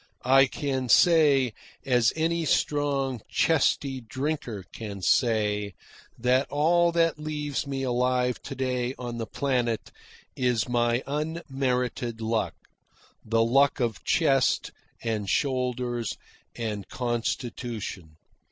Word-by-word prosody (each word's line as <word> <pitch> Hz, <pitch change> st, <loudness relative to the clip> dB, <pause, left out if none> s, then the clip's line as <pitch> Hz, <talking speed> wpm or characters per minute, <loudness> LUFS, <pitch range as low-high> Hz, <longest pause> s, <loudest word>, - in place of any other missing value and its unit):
I 135 Hz, +1 st, +6 dB
can 130 Hz, -2 st, -3 dB
say, 145 Hz, -8 st, +5 dB, 0.3 s
as 120 Hz, -3 st, +3 dB
any 165 Hz, +1 st, 0 dB
strong, 140 Hz, -4 st, 0 dB
chesty 140 Hz, -4 st, +1 dB
drinker 125 Hz, -, -4 dB
can 100 Hz, -4 st, -7 dB
say, 105 Hz, -2 st, +1 dB, 0.4 s
that 125 Hz, +3 st, +2 dB
all 170 Hz, +4 st, +3 dB
that 165 Hz, -2 st, +2 dB
leaves 150 Hz, -2 st, -3 dB
me 135 Hz, -1 st, -3 dB
alive 125 Hz, 0 st, +1 dB
to -, -, -7 dB
day 125 Hz, -1 st, -1 dB
on 120 Hz, -1 st, -5 dB
the 115 Hz, -, -3 dB
planet 120 Hz, -3 st, -1 dB, 0.4 s
is 125 Hz, -4 st, +1 dB
my 120 Hz, 0 st, +1 dB
unmerited 135 Hz, -6 st, -2 dB
luck 110 Hz, 0 st, -1 dB, 0.7 s
the 115 Hz, +1 st, +2 dB
luck 135 Hz, +5 st, +3 dB
of 115 Hz, -4 st, -1 dB
chest, 135 Hz, -6 st, +2 dB, 0.3 s
and 110 Hz, -4 st, -2 dB
shoulders, 125 Hz, -3 st, -1 dB, 0.4 s
and 105 Hz, -4 st, -4 dB
constitution. 115 Hz, -7 st, -4 dB
125 Hz, 105 wpm, -27 LUFS, 115-140 Hz, 0.7 s, I